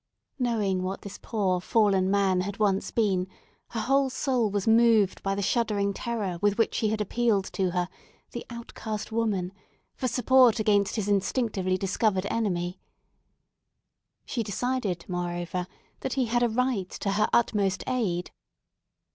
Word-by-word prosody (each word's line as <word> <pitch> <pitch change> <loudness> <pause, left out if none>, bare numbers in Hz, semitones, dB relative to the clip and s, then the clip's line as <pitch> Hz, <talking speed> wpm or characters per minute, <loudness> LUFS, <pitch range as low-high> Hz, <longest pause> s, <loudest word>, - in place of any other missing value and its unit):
Knowing 215 -7 0
what 185 +1 -4
this 200 -1 -8
poor 190 -5 0
fallen 195 -2 +2
man 195 -2 +2
had 200 +2 -4
once 200 -2 +1
been, 190 -5 +1 0.4
her 225 - -4
whole 270 +3 +2
soul 255 -3 0
was 200 0 -2
moved 225 -3 +4
by 195 0 -1
the 200 - -2
shuddering 205 -2 +1
terror 205 -6 -3
with 205 0 +2
which 225 - +1
he 215 - +1
had 215 0 -1
appealed 210 -1 +1
to 190 -2 -1
her—the 180 +6 -6
outcast 225 -2 -6
woman—for 205 +2 -3
support 250 -1 +4
against 205 -2 +2
his 215 -3 -2
instinctively 200 -2 0
discovered 195 0 0
enemy. 180 -5 -1 1.5
She 240 - -2
decided, 210 -4 -2
moreover, 175 0 -3 0.3
that 260 - -3
he 260 -2 +1
had 240 +1 +1
a 240 - +3
right 230 -5 0
to 200 - -3
her 210 +2 +2
utmost 200 -5 +1
aid. 190 -9 -1
205 Hz, 140 wpm, -27 LUFS, 190-230 Hz, 1.5 s, moved